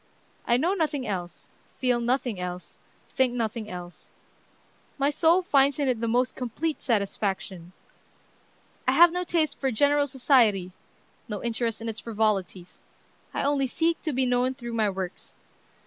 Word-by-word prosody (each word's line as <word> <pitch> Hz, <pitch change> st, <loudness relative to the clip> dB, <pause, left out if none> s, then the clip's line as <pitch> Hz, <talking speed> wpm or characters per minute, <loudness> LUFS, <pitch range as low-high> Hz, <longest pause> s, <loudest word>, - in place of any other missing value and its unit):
I 240 Hz, -, +4 dB
know 335 Hz, +9 st, +1 dB
nothing 305 Hz, -7 st, -1 dB
else, 180 Hz, -4 st, -5 dB, 0.3 s
feel 250 Hz, -2 st, +1 dB
nothing 240 Hz, -3 st, -1 dB
else, 180 Hz, 0 st, -7 dB, 0.3 s
think 255 Hz, -2 st, +1 dB
nothing 225 Hz, -2 st, -3 dB
else, 175 Hz, -2 st, -10 dB, 0.8 s
My 280 Hz, +1 st, +2 dB
soul 335 Hz, +4 st, +3 dB
finds 280 Hz, -4 st, +3 dB
in 285 Hz, -2 st, 0 dB
it 245 Hz, -3 st, 0 dB
the 230 Hz, -, 0 dB
most 245 Hz, +2 st, +1 dB
complete 280 Hz, +6 st, -3 dB
satisfaction.... 195 Hz, -5 st, -2 dB, 1.2 s
I -, -, +4 dB
have 345 Hz, 0 st, +7 dB
no 360 Hz, +1 st, -1 dB
taste 330 Hz, -3 st, 0 dB
for 270 Hz, -, 0 dB
general 285 Hz, +4 st, +3 dB
society, 240 Hz, -9 st, +3 dB, 0.6 s
no 210 Hz, -2 st, -4 dB
interest 230 Hz, -1 st, -2 dB
in 230 Hz, -, -5 dB
its 225 Hz, 0 st, -4 dB
frivolities. 205 Hz, -5 st, -2 dB, 0.5 s
I -, -, -2 dB
only 280 Hz, -1 st, +1 dB
seek 330 Hz, +6 st, 0 dB
to 315 Hz, -, -2 dB
be 260 Hz, -1 st, +1 dB
known 250 Hz, +1 st, +1 dB
through 240 Hz, -3 st, -7 dB
my 220 Hz, -2 st, +2 dB
works. 190 Hz, -2 st, -6 dB
245 Hz, 150 wpm, -26 LUFS, 210-280 Hz, 1.2 s, have